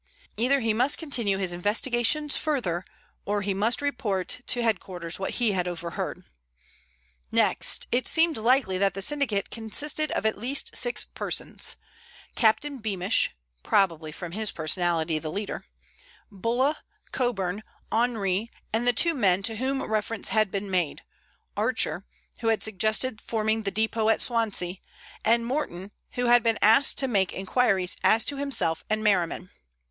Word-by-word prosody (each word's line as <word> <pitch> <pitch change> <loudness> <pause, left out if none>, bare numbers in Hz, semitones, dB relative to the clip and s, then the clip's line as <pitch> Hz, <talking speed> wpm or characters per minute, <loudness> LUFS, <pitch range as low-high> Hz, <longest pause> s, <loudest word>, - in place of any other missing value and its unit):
Either 260 +4 +2
he 225 -1 +1
must 250 +6 +3
continue 235 - -1
his 185 -2 0
investigations 240 - +1
further, 195 - -1 0.4
or 205 0 -1
he 200 0 0
must 220 +8 +1
report 230 -5 -1
to 245 -1 +2
headquarters 180 -6 -2
what 190 - -3
he 235 -4 +2
had 180 -2 -1
overheard. 170 -1 -4 1.1
Next, - - +1
it 245 +1 +1
seemed 325 -1 +3
likely 225 -4 +2
that 195 -1 +2
the 195 - -3
syndicate 265 -7 0
consisted 290 +7 -2
of - - -2
at 220 -2 +1
least 255 +6 -1
six 485 - 0
persons; - - -2 0.6
Captain 270 +5 +2
Beamish 200 - 0 0.3
(probably 165 - +1
from 170 +2 -7
his 215 +2 -2
personality 165 0 0
the 155 0 -5
leader), 205 +4 -4 0.7
Bulla, 240 +9 0 0.3
Coburn, 205 -6 -1 0.3
Henri, 220 -3 0 0.2
and 230 +2 0
the 245 - +5
two 335 +8 +3
men 195 - +2
to 225 +1 0
whom 265 +3 -1
reference 220 0 -2
had 215 -2 +2
been 195 +1 -4
made, 175 -5 -1 0.5
Archer, - - 0 0.3
who - - -3
had 225 -1 +2
suggested 220 +3 +1
forming 220 0 0
the 200 - -2
depot 220 +1 0
at 225 - +3
Swansea, 210 -6 0 0.5
and 230 +1 +3
Morton, 205 - -3 0.2
who 245 -1 -1
had 240 0 +6
been 225 -1 +1
asked 225 +7 +5
to 270 - +1
make 195 -7 +1
inquiries 190 -2 +1
as 215 +4 +4
to 285 - -1
himself 270 - 0
and 215 0 0
Merriman. 180 -3 +1
220 Hz, 150 wpm, -26 LUFS, 190-245 Hz, 1.1 s, had